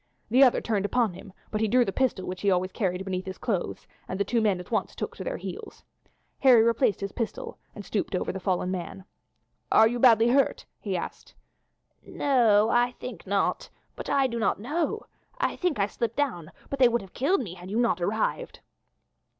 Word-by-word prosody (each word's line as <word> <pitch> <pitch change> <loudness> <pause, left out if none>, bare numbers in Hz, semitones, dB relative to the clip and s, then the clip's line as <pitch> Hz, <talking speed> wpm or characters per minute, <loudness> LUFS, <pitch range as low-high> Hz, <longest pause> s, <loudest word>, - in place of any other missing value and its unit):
The 255 +3 +5
other 260 -3 +6
turned 210 -4 -1
upon 220 -1 +1
him, 190 +2 -11 0.2
but 215 - -1
he 220 - +2
drew 245 +3 +4
the 195 - -2
pistol 235 -6 0
which 180 0 -6
he 200 - +2
always 185 0 +1
carried 190 -3 -2
beneath 185 -1 -3
his 190 - -6
clothes, 200 -7 -3 0.2
and 185 - -4
the - - +3
two 230 +2 0
men 205 -4 +2
at 180 - -10
once 215 -4 -1
took - - -5
to - - -6
their - - -3
heels. - - -8 0.6
Harry 250 -5 +6
replaced 230 -1 +2
his 195 0 -3
pistol 460 - -5 0.2
and 205 - -8
stooped 200 -2 -2
over - - -1
the 190 - -5
fallen 185 -1 -1
man. 185 +1 -6 0.7
"Are 220 - +7
you 240 +2 -2
badly 230 -2 +6
hurt?" 270 +2 +2
he - - -2
asked. - - -7 0.7
"No, 230 -7 +3
I 240 +1 +2
think 230 -9 -9
not, 200 0 0 0.3
but - - -7
I 275 -1 +3
do 235 -2 -2
not 225 - +1
know. 330 - -2 0.3
I - - 0
think 355 -4 -1
I 200 - +2
slipped 230 +3 -4
down; 210 - -2 0.2
but 275 - -3
they 250 -2 +7
would 235 -3 0
have 190 - -15
killed 280 +4 +1
me 180 -6 -7
had 180 0 -10
you 215 +4 -1
not 220 -6 +1
arrived." 220 - -1
220 Hz, 205 wpm, -27 LUFS, 190-250 Hz, 0.7 s, Are